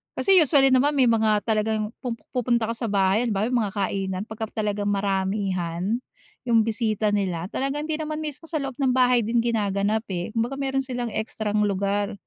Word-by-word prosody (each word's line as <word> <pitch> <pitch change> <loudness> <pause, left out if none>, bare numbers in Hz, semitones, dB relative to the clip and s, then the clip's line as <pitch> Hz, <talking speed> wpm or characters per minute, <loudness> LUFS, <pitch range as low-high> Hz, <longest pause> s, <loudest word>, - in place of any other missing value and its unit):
kasi 390 -1 +3
usually 280 -3 +5
naman 285 +3 +3
may 260 -3 +4
mga 215 -2 +3
talagang 215 0 0
pumu 240 -2 -2 0.2
pupunta 235 -2 +1
ka - - -4
sa 230 0 -3
bahay 195 +3 +2
halimbawa 210 +1 0
yung 245 - +2
mga 205 -4 -2
kainan 195 -1 -2
pagka 220 0 -6
talagang 205 -1 -1
maramihan. 195 0 -1 0.5
Yung 230 -2 +4
bisita 220 -1 0
nila, 185 -4 -1
talagang 285 +5 -2
hindi 310 - 0
naman 310 0 -4
mismo 305 +1 -6
sa 315 -3 -2
loob 270 -2 -4
ng 265 -3 +2
bahay 250 -3 +3
din 230 +2 +2
ginaganap, 215 -1 0
eh. 175 -1 -3
Kumbaga 230 +4 -1
meron 270 -1 0
silang 245 -2 -3
ekstrang 215 -1 -2
lugar 200 +1 -1
220 Hz, 180 wpm, -24 LUFS, 200-250 Hz, 0.5 s, usually